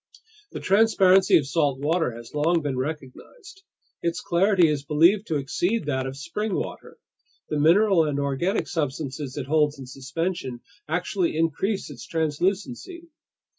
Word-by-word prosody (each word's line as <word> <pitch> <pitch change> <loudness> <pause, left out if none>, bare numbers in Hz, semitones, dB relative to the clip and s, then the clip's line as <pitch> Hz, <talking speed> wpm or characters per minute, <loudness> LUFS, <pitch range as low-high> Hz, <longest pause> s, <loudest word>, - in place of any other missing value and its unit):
The - - -6
transparency 195 -2 +4
of 145 - -1
salt 145 -2 0
water 150 -2 0
has 120 0 -11
long 160 +2 +1
been 140 -3 -2
recognized. 155 - -7 0.4
Its 170 +1 -1
clarity 185 0 +3
is 150 -2 -1
believed 170 +8 +3
to 160 - -1
exceed 175 +8 -1
that 130 -2 -1
of 135 +1 -7
spring 210 +8 -3
water. - - -6 0.5
The 150 - -1
mineral 175 +2 +4
and 145 -2 -1
organic 140 +8 -1
substances 145 -3 -4
it 140 - -3
holds 150 0 +1
in 135 - -9
suspension 135 0 -4 0.3
actually 175 0 -1
increase 165 +3 -1
its 135 - -10
translucency. 195 - -2
160 Hz, 140 wpm, -24 LUFS, 140-190 Hz, 0.5 s, transparency